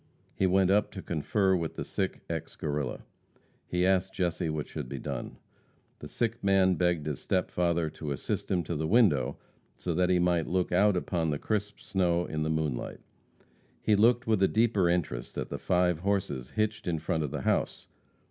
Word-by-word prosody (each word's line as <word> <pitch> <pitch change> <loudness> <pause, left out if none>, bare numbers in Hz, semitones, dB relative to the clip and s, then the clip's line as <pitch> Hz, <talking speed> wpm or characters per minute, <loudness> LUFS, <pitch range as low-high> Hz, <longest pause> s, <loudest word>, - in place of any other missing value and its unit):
He 95 - +1
went 95 0 +3
up 105 +1 +3
to 95 - -6
confer 95 +4 +1
with 85 -3 -3
the - - -4
sick - - -2
ex - - -5
Guerrilla. 70 -4 -3 0.6
He 90 0 +1
asked 95 0 +1
Jesse 85 -3 -1
what 75 -1 -3
should 60 - -6
be 70 - -5
done. - - -5 0.6
The 75 - -8
sick 115 +7 -2
man 95 -1 +4
begged 85 -2 +1
his 75 -3 -3
step 90 -1 -1
father 85 -2 +1
to 75 -1 -6
assist 70 - -3
him 90 -2 +1
to 85 +2 -4
the 80 +1 -1
window 100 - +3 0.4
so 90 - -3
that 90 +2 +2
he 90 - +4
might 85 -2 +2
look 90 0 0
out 100 +2 +4
upon 85 -2 -1
the 75 - 0
crisp 105 +3 -2
snow 90 -2 +1
out - - -8
in 75 0 -2
the 80 - 0
moonlight. 80 -6 -2 0.8
He 105 - +4
looked 120 +4 +4
with 110 -3 +2
a 95 - +6
deeper 105 -5 +2
interest 80 -9 -2
at - - -3
the - - -4
five 90 -2 +2
horses 90 -10 -1
hitched 110 -2 -1
in 85 -2 0
front 80 +1 -1
of 75 - -1
the - - -4
house. - - 0
90 Hz, 195 wpm, -29 LUFS, 80-95 Hz, 0.8 s, a